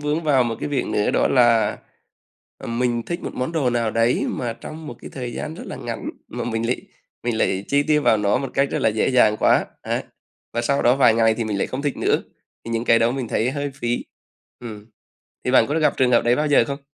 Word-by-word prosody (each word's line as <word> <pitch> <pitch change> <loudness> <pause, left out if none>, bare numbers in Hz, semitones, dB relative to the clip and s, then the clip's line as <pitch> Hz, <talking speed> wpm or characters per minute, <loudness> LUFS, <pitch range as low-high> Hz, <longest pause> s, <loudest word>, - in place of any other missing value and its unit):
vướng 150 +2 -1
vào 135 -4 +4
một 115 -2 -2
cái - - -3
việc 140 -3 -1
nữa 105 - 0
đó - - +2
là, 115 -4 +3 0.8
ờ, - - -9
mình 120 0 -1
thích 175 +1 -4
một - - -5
món 130 +5 -3
đồ 145 -7 +1
nào 115 -2 0
đấy 115 +2 +1
mà 120 -2 -3
trong 155 +6 -9
một 120 - -7
cái - - -9
thời 125 -3 -5
gian 155 +1 -5
rất - - -8
là - - -6
ngắn - - -5 0.2
mà - - -5
mình 115 -1 -2
lại 125 - -1 0.4
mình 120 -2 -1
lại 95 -1 0
chi 145 0 +2
tiêu 150 0 +2
vào 110 - +4
nó 105 +3 +2
một 135 0 -4
cách 140 0 +2
rất - - -1
là - - +4
dễ 110 0 0
dàng 110 -5 +4
quá, - - +3 0.2
ấy, - - -2 0.5
và 120 - 0
sau 140 +4 +1
đó 120 +2 +4
vài 135 -5 +5
ngày 115 -1 +3
thì 115 - -2
mình 105 -2 -2
lại - - 0
không 130 - -4
thích 145 -1 -2
nữa, - - +1 0.4
thì 115 - -5
những 115 +1 -1
cái 115 0 +5
đó 115 +1 +2
mình 130 -3 -3
thấy 120 +4 0
hơi 145 0 -3
phí. 120 -2 -2 0.6
Ừm, 110 -3 -9 0.6
thì 125 - +1
bạn 130 - +5
có 155 +3 0
gặp 155 - +2
trường 125 -1 +3
hợp 120 - +4
đấy 120 +1 +3
bao 150 +2 0
giờ 145 -5 +5
không? 140 0 -4
120 Hz, 255 wpm, -22 LUFS, 115-140 Hz, 0.8 s, vài